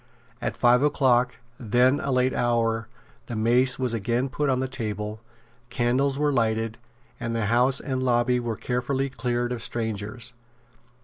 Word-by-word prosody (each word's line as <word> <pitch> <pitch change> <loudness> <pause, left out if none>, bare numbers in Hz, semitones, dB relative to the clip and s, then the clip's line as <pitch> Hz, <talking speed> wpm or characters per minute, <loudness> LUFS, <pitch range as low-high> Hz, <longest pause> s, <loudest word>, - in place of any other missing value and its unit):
At - - -3
five 120 +1 +4
o'clock, 130 -4 +3 0.2
then 125 +4 +3
a 140 - -2
late 130 0 +2
hour, 115 -2 0 0.4
the 120 - -5
mace 120 +4 +3
was 125 -3 -1
again 120 +4 0
put 145 +2 -1
on 130 -1 +2
the 130 - -1
table; 105 -3 -4 0.5
candles 135 +3 +1
were 145 0 +1
lighted; 115 -2 0 0.4
and 115 0 -3
the 115 -2 0
House 125 +5 +3
and 130 -2 -3
lobby 125 0 +2
were 115 -3 -3
carefully 130 +2 -1
cleared 120 -1 -1
of 120 -2 -3
strangers. 115 +1 -4
120 Hz, 150 wpm, -25 LUFS, 115-130 Hz, 0.5 s, five